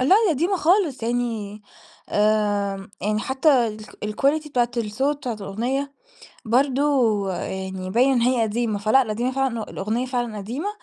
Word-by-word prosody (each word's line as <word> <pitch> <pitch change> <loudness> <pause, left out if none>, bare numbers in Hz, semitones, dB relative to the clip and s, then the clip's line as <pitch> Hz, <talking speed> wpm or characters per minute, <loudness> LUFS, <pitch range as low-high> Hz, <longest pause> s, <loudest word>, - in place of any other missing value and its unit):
لا، 255 - +2 0.2
دي - - +3
قديمة 345 +7 0
خالص 330 - +2
يعني 225 -3 -2 0.5
آمم، 205 -2 +1
يعني 210 +2 0
حتى 265 -1 +3
الك 215 -1 -8 0.3
الquality 300 +2 +2
بتاعة 245 -4 +1
الصوت 235 +6 0
بتاعة 250 -5 -4
الأغنية 240 +8 -3 0.5
برضو 255 -4 +2
يعني 190 0 -4
باين 250 +6 +4
إن 245 - +2
هي 245 -1 +2
قديمة. 220 -1 -1
فلأ، 215 +6 +4
قديمة 240 +4 -1
فعلًا 265 -3 -1
ه - - -2
الأغنية 225 +6 -2
فعلًا 240 -4 -2
قديمة، 245 - -4
235 Hz, 150 wpm, -23 LUFS, 210-270 Hz, 0.5 s, باين